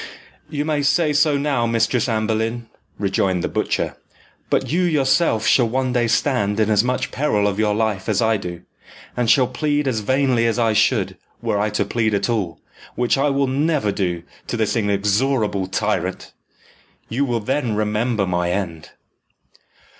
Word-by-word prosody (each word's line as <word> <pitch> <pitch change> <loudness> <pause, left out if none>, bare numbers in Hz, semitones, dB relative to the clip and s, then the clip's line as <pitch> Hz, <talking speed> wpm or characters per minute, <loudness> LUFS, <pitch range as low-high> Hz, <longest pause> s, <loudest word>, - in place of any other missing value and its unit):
"You 145 0 -2 0.2
say 150 +2 +2
so 150 0 +3
now, 140 -5 0
Mistress 115 +1 +1
Anne 110 -1 0
Boleyn," 115 +2 -2 0.3
rejoined 95 -2 0
the - - 0
butcher; - - -2 0.5
"but - - 0
you 175 +4 +2
yourself 140 -7 +2
shall 120 -4 +4
one 130 +1 -1
day 120 -2 +2
stand 110 -4 +1
in 110 0 +2
as 105 0 +4
much 125 +1 -1
peril 105 -8 +1
of 100 0 -2
your 105 -1 +2
life 110 -3 -1
as 100 -3 +1
I 110 -1 +2
do, 90 -3 -7 0.5
and 120 -2 0
shall 130 +1 +5
plead 145 +3 -1
as 120 -4 0
vainly 130 +1 +1
as 115 - 0
I 115 -2 +2
should, 105 -3 +1 0.2
were 100 - -1
I 105 +1 +1
to 105 -1 -1
plead 110 0 0
at 100 +4 0
all, 95 -9 -2 0.4
which 125 -1 +1
I 140 +1 +1
will 140 0 +1
never 140 -3 0
do 90 -4 -2 0.2
to 120 - -3
this 110 +1 0
inexorable 105 0 0
tyrant. - - -2 0.7
You 130 +5 -1
will 120 -4 0
then 125 0 -1
remember 105 0 0
my 90 -1 -1
end." 85 -5 -4
115 Hz, 170 wpm, -21 LUFS, 105-130 Hz, 0.7 s, shall